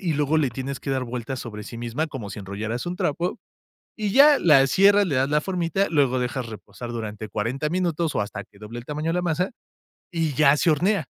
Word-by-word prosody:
y 170 -5 -1
luego 150 +2 +2
le 140 -5 +1
tienes 135 +2 -5
que 140 - -4
dar 130 -1 0
vueltas 125 +2 -5
sobre 105 -3 -7
sí 115 - -8
misma, 120 +7 -2
como 120 -9 -7
si - - -7
enrollaras 105 - -4
un 180 +1 -3
trapo. 175 - -1 0.6
Y 210 -2 -1
ya 285 +3 +7
la 140 -5 +6
cierras, 200 +6 +5
le 145 -6 -1
das 135 +2 +2
la 150 0 +2
formita, 185 +1 0
luego 135 -5 +2
dejas 125 0 -2
reposar 120 +2 -8
durante 110 -2 -5
40 130 +8 -2
minutos, 170 -3 0
o - - +2
hasta 100 0 -5
que 100 - -23
doble 110 +3 -7
el 120 - -12
tamaño 150 +2 -3
de - - +1
la 180 - 0
masa, 175 - 0 0.6
y 165 -4 -1
ya 150 0 +5
se 170 - +2
hornea. 175 +1 +1
140 Hz, 225 wpm, -24 LUFS, 120-170 Hz, 0.6 s, ya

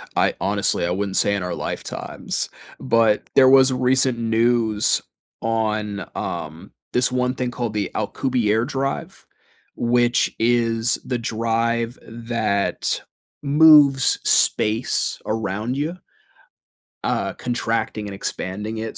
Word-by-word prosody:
I, - - +2
honestly - - 0
I 90 - -1
wouldn't 95 +1 -2
say 100 - +3
in 95 - -3
our 90 -1 -3
lifetimes, - - -4 0.3
but 115 -4 +2
there 130 -1 +7
was 135 0 +6
recent 130 -1 +2
news 115 -1 +2 0.4
on, 110 -3 -2
um, - - -6 0.2
this 125 +1 +2
one 125 0 0
thing 125 -1 -2
called 120 -3 -4
the 105 -3 -2
Alcubierre 115 0 0
drive, 135 0 -4 0.5
which 120 0 +1
is 115 -1 +2
the 125 - -1
drive 115 +1 -1
that 115 -3 -2 0.4
moves 145 -2 +6
space 110 +4 +1
around 110 +3 -2
you 165 +5 -3 1.0
uh, - - -1
contracting 115 -3 -2
and 100 - -6
expanding 105 +4 -4
it 110 0 -5
115 Hz, 115 wpm, -21 LUFS, 110-125 Hz, 1.0 s, there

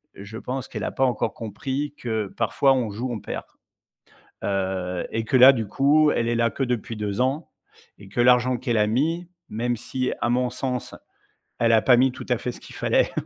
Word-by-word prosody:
Je 100 +3 -9
pense 130 +2 -5
qu'elle - - -6
a - - -2
pas 135 - +1
encore 125 - -1
compris 135 +6 -4
que 110 -3 -2
parfois 135 -1 +3
on 125 -4 0
joue, 120 +5 -4
on 115 - -4
perd. 105 - -6 1.0
Heu, 95 -2 -2
et 115 - -2
que 130 - +1
là, 130 +2 +9
du 115 -5 -2
coup, 150 +7 +3
elle 115 -4 0
est 120 - +1
là 115 0 +2
que - - -4
depuis 120 -2 -3
2 105 +1 -3
ans 135 +5 0 0.5
et 100 - -13
que 120 - -2
l'argent 125 +1 +4
qu'elle 120 -1 -1
a 105 - +3
mis, 160 +10 0 0.2
même 120 +2 -2
si 130 +3 -3
à 120 - +1
mon 125 0 +1
sens, 125 0 -4 0.7
elle 115 -1 +3
a 110 - +5
pas 125 +1 +5
mis 130 +1 +4
tout 130 - -9
à 125 - +2
fait 125 - -4
ce - - -12
qu'il - - -12
fallait. - - +1
120 Hz, 215 wpm, -24 LUFS, 110-130 Hz, 1.0 s, là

